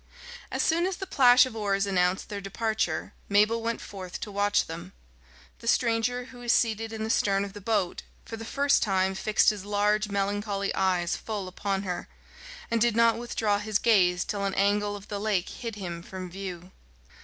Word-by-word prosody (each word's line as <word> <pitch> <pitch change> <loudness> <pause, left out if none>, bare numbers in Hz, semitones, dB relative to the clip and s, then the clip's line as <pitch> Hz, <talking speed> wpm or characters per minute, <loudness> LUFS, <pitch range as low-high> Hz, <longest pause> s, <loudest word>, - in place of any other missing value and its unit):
As - - 0
soon 340 +3 +2
as 380 -1 -3
the 385 - -5
plash 250 -7 +6
of 255 -3 -7
oars 200 -2 0
announced 185 -1 +1
their 205 -1 -5
departure, 220 +3 -2 0.2
Mabel 210 +3 +3
went 230 0 -2
forth 185 -3 -7
to 210 - -5
watch 205 +1 +2
them. 165 +1 -8 0.7
The - - -10
stranger, 245 +1 +1
who 245 0 -13
was 240 -1 0
seated 225 -2 +1
in 220 -1 -4
the 220 - -3
stern 200 -2 +2
of 195 - -9
the 205 - -9
boat, 200 -3 0 0.2
for 225 - -6
the 225 - -8
first 280 +4 +2
time 190 -2 +1
fixed 210 +3 +3
his 205 -3 -7
large 210 +1 +1
melancholy 200 0 -1
eyes 180 -2 +1
full 210 -4 -5
upon 195 +1 -2
her, 180 -2 -4 0.6
and 230 -1 +1
did 235 -1 +3
not 230 0 +4
withdraw 220 -3 0
his 210 0 0
gaze 180 -6 +3
till 200 -1 -3
an 195 -1 -1
angle 205 +1 +1
of 205 0 -10
the 205 -2 -4
lake 200 -4 0
hid 230 -3 -6
him 175 -4 -5
from 185 0 -8
view. 185 -1 -7
205 Hz, 190 wpm, -27 LUFS, 195-225 Hz, 0.7 s, plash